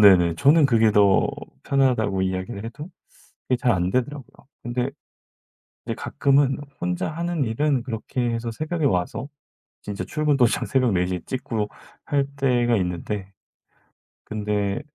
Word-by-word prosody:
네네. 90 -5 +7
저는 145 - +5
그게 115 -4 +4
더 100 -2 +5 0.4
편하다고 120 -8 +2
이야기를 95 +3 -3
해도 145 +8 -7 0.6
그게 125 - +3
잘 120 -1 +2
안되더라고요. 120 +11 -2 0.2
근데 125 +2 -2 0.9
근데 - - -3
가끔은 140 -1 +2 0.2
혼자 90 0 -1
하는 170 -1 -1
일은 130 +3 +1
그렇게 120 +1 -4
해서 115 0 -2
새벽에 155 +6 -3
와서 95 +4 0 0.5
진짜 100 -1 -4
출근 150 -2 +1
도장 120 -4 +3
새벽 130 -5 +2
4:00 90 0 +1
에 90 - -6
찍고 115 -5 -2 0.4
할 140 -2 +1
때가 120 -4 +2
있는데 95 +2 -3 0.9
근데 105 -2 -1
120 Hz, 275 characters per minute, -24 LUFS, 100-135 Hz, 0.9 s, 네네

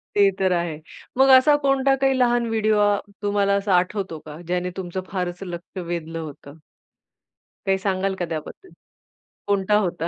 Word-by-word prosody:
ते 200 -1 +5
तर 190 -1 +2
आहे. 170 -3 -2 0.4
मग 270 0 +5
असा 290 +3 +5
कोणता 275 0 +3
काही 270 -1 +3
लहान 240 -1 +3
व्हिडिओ 215 -1 +1
आ 205 0 +4 0.3
तुम्हाला 200 -1 +1
असा 200 -1 0
आठवतो 180 -3 -2
का? 150 +1 -9
ज्याने 180 0 -1
तुमचं 185 0 -4
फारच 180 0 -3
लक्ष 175 +2 -8
वेधलं 165 -1 -4
होतं? 150 0 -10 1.1
काही 195 0 +2
सांगाल 190 0 -1
का 175 - 0
त्याबद्दल? 160 - -7 0.8
कोणता 200 +1 +2
होता? 175 -4 -1
190 Hz, 155 wpm, -23 LUFS, 175-210 Hz, 1.1 s, ते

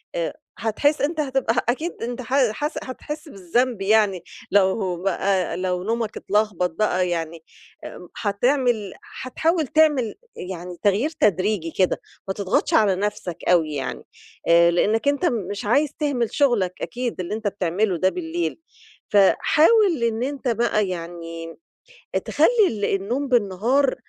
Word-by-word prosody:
آآ - - -2 0.2
هتحس 285 +7 +1
أنت 310 +3 -1
هتبقى 265 -5 0
أكيد 310 +8 -1
أنت 245 +1 -4
ه 255 -1 +2
حاس 295 +8 -3
هتحس 300 +4 -7
بالذنب 225 +3 -1
يعني 200 -3 +2 0.3
لو 190 -1 +2
بقى 195 -2 0
لو 180 -1 -2
نومك 225 +1 -2
اتلخبط 205 -3 0
بقى 185 -1 0
يعني 165 -1 -4 0.4
آآ 180 - -9
هتعمل 230 0 0
حتحاول 320 +4 -1
تعمل 295 -7 +2 0.2
يعني 180 -1 -7
تغيير 210 +8 +2
تدريجي 200 - 0
كده، 185 -2 +2 0.3
ما 190 - -1
تضغطش 200 0 0
على 205 -3 +4
نفسك 190 -3 -3
أوي 160 -4 +3
يعني، 135 -2 -4 0.4
آآ 170 0 +6
لإنك 215 +8 +1
أنت 285 +4 +2
مش 205 - -2
عايز 280 +8 +3
تهمل 260 -7 -1
شغلك 235 -11 +2
أكيد 240 +6 -4
اللي 180 +2 -3
أنت 215 0 -3
بتعمله 190 0 0
ده 185 +3 +3
بالليل. 170 - -3 0.5
فحاول 315 - +4
إن 230 +1 0
أنت 275 0 -4
بقى 220 -3 +1
يعني 165 -1 -6 0.7
تخلّي - - +3 0.2
ال 205 -2 -3
النوم 235 +9 -1
بالنهار 245 +4 +2
210 Hz, 135 wpm, -23 LUFS, 185-255 Hz, 0.7 s, آآ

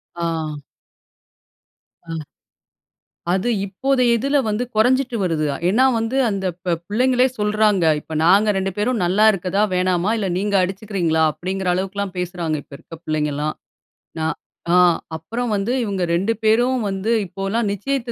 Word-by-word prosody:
ஆ. 170 0 -3 1.9
ம். 160 -2 -4 1.1
அது 190 +6 0 0.2
இப்போத 265 +7 0 0.2
இதுல 275 +5 0
வந்து 215 +4 0
கொறைஞ்சுட்டு 250 +2 +2
வருது. 165 -4 0 0.2
ஏன்னா 225 +8 +4
வந்து 225 +3 -2
அந்த 195 -2 -2 0.2
ப 175 -2 +1
பிள்ளைங்களே 250 +4 +3
சொல்றாங்க. 210 -3 +2 0.2
"இப்ப 160 - -8
நாங்க 200 +5 +5
2 195 0 -1
பேரும் 215 0 0
நல்லா 195 +5 +3
இருக்றதா, 195 +1 -1
வேணாமா? 180 +2 +1
இல்ல 200 -3 -1
நீங்க 200 +1 -1
அடிச்சுக்றீங்களா?" 185 -4 -1
அப்டிங்கற 185 +4 -4
அளவுக்குல்லாம் 195 +1 -3
பேசுறாங்க. 175 -3 -2
இப்ப - - -29
இருக்க 165 - -12
பிள்ளைங்கள்லாம். 150 -1 -1 0.7
நான் 160 0 -1 0.4
ஆ - - +5 0.4
அப்பறம் 230 +8 -3
வந்து 200 +4 -1
இவங்க 200 -4 -2
2 195 +6 +1
பேரும் 240 +3 +3
வந்து 195 +4 -2
இப்போல்லாம் 195 +4 -2
நிச்சயத்து 235 +4 -2
195 Hz, 135 wpm, -21 LUFS, 180-225 Hz, 1.9 s, நாங்க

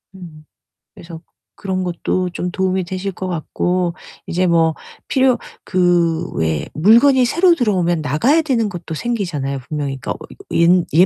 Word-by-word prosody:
음. 160 -5 -12 0.5
그래서 165 -1 -11 0.3
그런 190 -1 -3
것도 180 +1 -2
좀 180 0 -3
도움이 190 0 -1
되실 190 +2 -4
것 185 0 -6
같고 180 +1 -1 0.3
이제 180 +2 0
뭐 165 -1 +3 0.3
필요 260 -2 +3 0.3
그 175 -2 +1
왜 80 -2 -1
물건이 240 - +5
새로 340 +7 +4
들어오면 180 - +1
나가야 195 - +2
되는 245 -8 0
것도 175 -3 -7
생기잖아요 160 - -3
분명히. 145 -3 -3
그러니까 135 - -5
어 - - -4
이거 395 - -14
옛 175 +1 +4
옛 175 +4 +6
180 Hz, 310 characters per minute, -18 LUFS, 165-205 Hz, 0.5 s, 옛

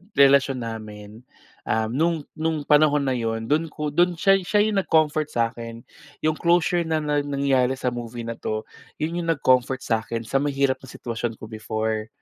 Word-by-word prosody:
relasyon 140 -1 +5
namin 110 -1 -8 0.5
uhm, 110 0 0
no'ng, 165 +6 +1 0.2
no'ng 160 0 0
panahon 150 0 +4
na 135 - 0
'yon 115 -1 -2
do'n 160 +3 +2
ko 150 -1 -4
do'n 175 +3 +2
siya, 195 +3 +4
siya 200 +3 +1
'yong 210 -2 +1
nag-comfort 155 -2 +2
sa'kin 115 -3 -3 0.4
'yong 155 0 +1
closure 175 0 +2
na-nangyari 145 -4 +1
sa 130 -1 -2
movie 120 0 -6
na 115 0 -5
'to, 110 0 -3 0.4
'yon 165 +3 -2
yung 170 - -4
nag-comfort 130 -2 +2
sa'kin 115 0 -2
sa 135 +4 0
mahirap 140 -2 0
na 130 - -14
sitwasyon 115 -1 -4
ko - - -18
before. 110 0 -3
135 Hz, 160 wpm, -24 LUFS, 115-155 Hz, 0.5 s, relasyon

